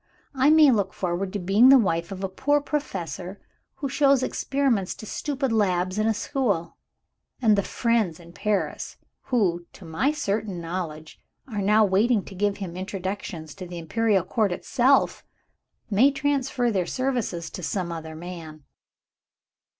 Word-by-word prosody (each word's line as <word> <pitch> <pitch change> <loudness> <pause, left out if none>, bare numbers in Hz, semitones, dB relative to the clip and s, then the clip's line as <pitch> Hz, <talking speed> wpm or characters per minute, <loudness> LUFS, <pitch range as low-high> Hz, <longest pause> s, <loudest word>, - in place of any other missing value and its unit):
I 270 +1 +3
may 310 -2 +7
look 200 -5 0
forward 185 +1 -2
to - - -1
being 200 +7 +5
the 270 - +9
wife 170 -6 0
of 195 0 -6
a - - +1
poor 290 +10 +1
Professor, 190 - -4 0.4
who 275 +1 -3
shows 275 -1 +3
experiments 260 -11 0
to - - -10
stupid 275 +2 -2
lads 185 -3 +1
in 215 - +2
a 225 - +3
school. 205 - -1 0.6
And 220 -5 +4
the 200 - +2
friends 220 -6 0
in 170 0 -14
Paris, 210 +1 -2 0.3
who, 180 -9 0
to 190 - -13
my 165 - 0
certain 210 - -2
knowledge, 165 -2 -6 0.3
are 210 -5 -3
now 210 +2 +4
waiting 205 +3 +2
to - - -10
give 200 +1 0
him 185 -4 -6
introductions 185 -4 -5
to 185 - -8
the 175 0 -7
Imperial 200 +3 +1
Court 215 -1 0
itself, 260 +8 +2 0.7
may 230 +8 +5
transfer 270 -3 0
their 185 -4 0
services 245 -10 -2
to - - -7
some 175 +1 -2
other 160 -1 -6
man. 160 -3 -9
200 Hz, 155 wpm, -25 LUFS, 175-250 Hz, 0.7 s, the